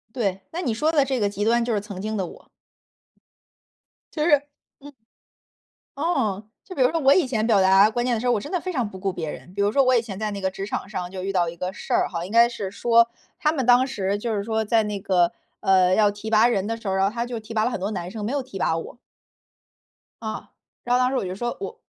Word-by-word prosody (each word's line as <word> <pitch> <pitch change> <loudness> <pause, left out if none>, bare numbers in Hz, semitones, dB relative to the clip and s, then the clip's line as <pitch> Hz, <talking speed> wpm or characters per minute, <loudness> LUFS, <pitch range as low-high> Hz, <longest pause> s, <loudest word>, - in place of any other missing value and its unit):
对， 195 -6 -1
那 340 - -3
你 250 -11 -1
说 305 +8 +1
的 295 -4 +4
这 265 -1 -1
个 205 -3 +1
极 205 0 -3
端， 235 +1 +3
就 240 - -1
是 210 - +1
曾 200 -2 -8
经 215 +2 -3
的 190 -3 -1
我。 - - -14 1.7
就 305 - -2
是 290 -2 +4 0.3
嗯。 290 +1 -12 1.1
哦。 260 - 0 0.2
就 370 - -10
比 265 - +2
如 250 - +5
说 330 - 0
我 275 -1 +5
以 345 -1 +4
前 225 -4 -1
表 210 -4 +4
达 195 +2 +6
观 240 +2 -1
念 250 -1 +1
的 220 - -2
时 250 - -3
候， 245 - +4
我 220 - +1
真 - - -8
的 360 -2 -1
非 370 - -4
常 245 -9 -1
不 190 - -10
顾 195 0 -2
别 165 -4 -4
人。 180 - -10
比 200 - -3
如 205 +1 +2
说 275 - +4
我 255 -1 +4
以 - - +4
前 210 -4 -7
在 215 0 -2
那 200 -1 -5
个 190 - 0
职 195 +1 -6
场 200 -1 -4
上 180 -4 -5
就 190 -1 -6
遇 195 - -2
到 175 -3 +1
一 170 - -7
个 180 +2 -4
事 - - -7
儿 - - +3
哈， 170 -1 -4
应 185 - -8
该 235 +2 +6
是 210 -5 -5
说， 235 +2 +3 0.3
他 305 -3 +2
们 270 -6 -2
当 250 +1 +6
时 200 -7 -2
就 220 +1 -2
是 200 - -2
说 220 0 -1
在 220 +1 +2
那 210 -1 -3
个， 180 -3 +2 0.3
呃， 185 -1 +4
要 210 0 +4
提 205 +2 -7
拔 220 +1 +5
人 205 -5 +1
的 230 - -2
时 225 - -12
候， 190 - 0
然 190 0 +2
后 200 - -1
他 235 0 -2
就 240 -2 -5
提 220 +1 -10
拔 215 -1 +1
了 245 - +1
很 200 - -4
多 195 +3 -2
男 180 -4 -4
生， 210 +1 -6
没 215 - -2
有 285 - 0
提 255 -6 -9
拔 160 - +1
我。 165 - -8 1.3
啊， 220 -1 -6 0.3
然 245 - +1
后 - - +2
当 255 0 +3
时 270 - -1
我 255 - -1
就 185 - -4
说， 240 +4 -3
我 455 +4 -6
220 Hz, 300 characters per minute, -24 LUFS, 195-245 Hz, 1.7 s, 达